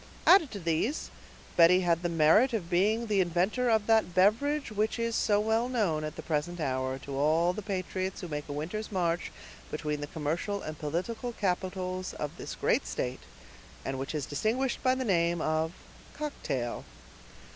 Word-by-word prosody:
Added 350 -7 +7
to 205 - -6
these, 170 - -1 0.4
Betty 175 +2 +6
had 170 -2 +2
the 175 - -1
merit 170 - +4
of 185 -6 -3
being 210 +6 +2
the 205 -3 +2
inventor 185 +8 +1
of 220 -2 +3
that 220 -6 +3
beverage 235 +9 +2
which 215 +2 0
is 230 -1 -1
so 205 -1 +3
well 220 +3 +1
known, 195 -11 0
at 155 - -4
the - - -7
present 165 +3 -2
hour, 130 -2 -1
to 135 0 -7
all 160 +5 +3
the 210 - -5
patriots 190 -1 -3
who 180 - -5
make 150 -2 -5
a - - -3
winter's 175 +10 -4
march 175 -3 0 0.4
between 150 -1 -3
the 145 - -4
commercial 165 +7 -2
and 155 -1 -6
political 185 +11 -3
capitals 185 -2 -2
of 150 - -4
this - - -6
great - - +1
state, - - -3 0.7
and 135 0 -3
which 135 +3 -4
is 145 -3 -2
distinguished 235 - -1
by 255 0 +3
the 260 0 -2
name 170 -4 +2
of 155 +1 0 0.4
"cocktail." 135 - -3
180 Hz, 175 wpm, -30 LUFS, 155-220 Hz, 0.7 s, Added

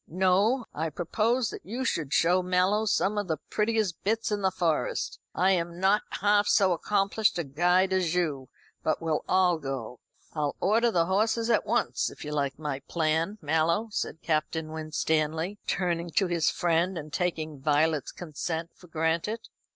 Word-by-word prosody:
No; 190 - +2
I 160 +2 -2
propose 220 - 0
that - - -8
you 245 +6 -4
should 155 - -1
show 180 +4 +3
Mallow 185 +4 +2
some 205 +1 +1
of 205 - -3
the 160 -2 -1
prettiest 210 -5 0
bits 225 +2 0
in 205 -1 -1
the 190 - +3
Forest. 175 -4 -1 0.2
I 185 +2 +3
am 170 -1 -1
not 195 +3 +3 0.2
half 205 0 +3
so 200 -2 +4
accomplished 200 +4 +1
a 170 - 0
guide 180 +6 +2
as 180 -3 +1
you; 150 -7 -1 0.3
but 155 - 0
we'll 160 -2 -1
all 180 -3 +3
go. 135 -4 -5 0.3
I'll 150 -2 -1
order 225 +5 +3
the 170 -6 +2
horses 220 +5 +1
at - - +2
once - - 0
if - - -10
you 150 - -5
like 140 -2 -1
my 145 -3 -3
plan, 165 +4 0
Mallow," 160 +8 +1
said 170 -4 -4
Captain 155 0 -1
Winstanley, 160 +3 -1
turning 175 -2 -1
to 195 - +4
his 175 -3 +1
friend, 175 +2 +1
and 155 -1 -7
taking 160 -5 -2
Violet's 150 +1 +1
consent 165 0 -5
for 180 - -17
granted. 165 +8 -1
175 Hz, 165 wpm, -28 LUFS, 160-200 Hz, 0.3 s, so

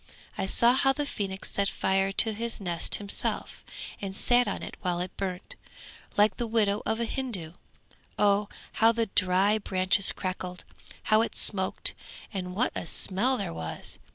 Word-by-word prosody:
I 190 - -2
saw 235 +5 +4
how 270 +1 +5
the 290 +1 -2
phoenix 195 -8 -4
set 200 0 +1
fire 195 0 0
to 220 +2 +4
his 230 +2 -4
nest 175 -4 +1
himself 200 -1 -3 0.4
and 195 -1 -5
sat 245 +2 +3
on 200 - -3
it - - -7
while 175 -2 -1
it 180 +1 -4
burnt, 185 -2 -5 0.6
like 210 +1 +4
the 240 - -2
widow 210 -2 +1
of 220 - 0
a 235 - 0
Hindoo. 220 -11 -3 0.6
Oh, 205 0 +2 0.2
how 225 +1 +4
the 230 0 0
dry 190 +3 +3
branches 190 0 +3
crackled, 185 -1 -5 0.4
how 215 0 +4
it 230 - -2
smoked, 190 -2 0 0.4
and 180 -2 -4
what 245 +5 +1
a - - -4
smell 225 +11 +2
there 85 - -4
was! 80 -1 -4
200 Hz, 165 wpm, -28 LUFS, 185-225 Hz, 0.6 s, how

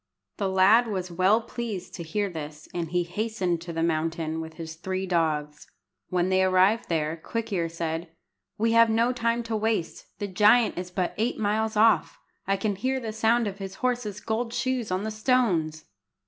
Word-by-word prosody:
The 195 - 0
lad 200 +6 +5
was 185 -4 -3
well 190 +6 +3
pleased 225 -5 -5
to - - -6
hear 200 +5 -1
this, 155 -4 -8
and 170 -2 -3
hastened 180 0 -1
to 170 0 -6
the 165 0 -1
mountain 160 0 -1
with 160 0 -8
his 160 -1 -7
three 185 +3 -3
dogs. 155 -4 -1 0.4
When 180 0 +1
they 190 0 +3
arrived 190 +4 +3
there, 160 -1 0
Quick 225 +6 -4
ear 170 -3 0
said 165 0 -4 0.5
"We 225 +2 +2
have 230 0 +6
no 230 +3 +2
time 235 -1 0
to 230 -1 -3
waste. 215 -5 -1
The 205 - -3
giant 210 +5 +4
is 180 0 -5
but 180 0 -2
eight 230 +3 0
miles 220 +1 0
off. 225 +1 +4 0.3
I 195 0 +2
can 200 0 -1
hear 260 +5 0
the 225 -3 -5
sound 225 +2 +2
of 200 -1 -5
his 195 -1 -6
horse's 240 -5 -2
gold 230 +1 -2
shoes 260 -3 -1
on 185 +2 -1
the 220 - -3
stones!" 215 -10 +1
195 Hz, 185 wpm, -26 LUFS, 170-225 Hz, 0.5 s, have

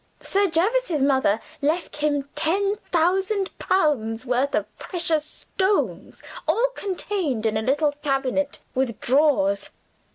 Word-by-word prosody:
Sir 400 +1 +1
Jervis's 350 - +1
mother 265 -6 +3 0.2
left 310 +3 -1
him 290 -2 0
ten 395 +5 +1
thousand 380 +4 +1
pounds' 260 -10 +1
worth 255 +3 +1
of - - 0
precious 335 -4 0
stones 380 +5 -2 0.2
all 455 +11 +3
contained 365 - -2
in 220 -1 +1
a 220 - +1
little 290 +6 +2
cabinet 280 0 -1
with 260 -4 -1
drawers. 245 -8 +2
300 Hz, 120 wpm, -24 LUFS, 265-375 Hz, 0.2 s, mother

